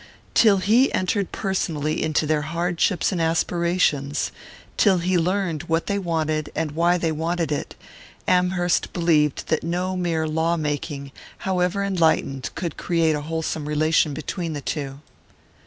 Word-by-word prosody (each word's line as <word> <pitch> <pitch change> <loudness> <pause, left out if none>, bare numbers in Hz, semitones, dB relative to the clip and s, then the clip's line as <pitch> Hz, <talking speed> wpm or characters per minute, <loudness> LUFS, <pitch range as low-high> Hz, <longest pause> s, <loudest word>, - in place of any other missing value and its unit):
Till 215 -4 +5
he 220 +8 +3
entered 190 +1 0
personally 160 -6 -1
into 155 0 +1
their 155 0 +1
hardships 170 +5 0
and 180 -3 -1
aspirations 165 -3 +1 0.4
till 195 -3 +4
he 180 +2 0
learned 180 -2 0
what 165 +1 +1
they 200 -1 -1
wanted 155 -4 -1
and 160 -1 -1
why 170 +3 +2
they 165 -2 0
wanted 165 0 -1
it 145 - -3 0.5
Amherst 180 -1 +2
believed 155 -5 +1
that 160 - +1
no 180 +3 -2
mere 165 -3 0
law 160 +2 +1
making, 145 -2 -3 0.3
however 185 +1 +1
enlightened, 160 -8 +1
could 170 -3 -4
create 165 -2 +1
a 150 - -3
wholesome 160 -1 -3
relation 155 -1 +2
between 165 +2 -4
the 145 - -3
two. 140 +1 -4
165 Hz, 140 wpm, -23 LUFS, 155-180 Hz, 0.5 s, Till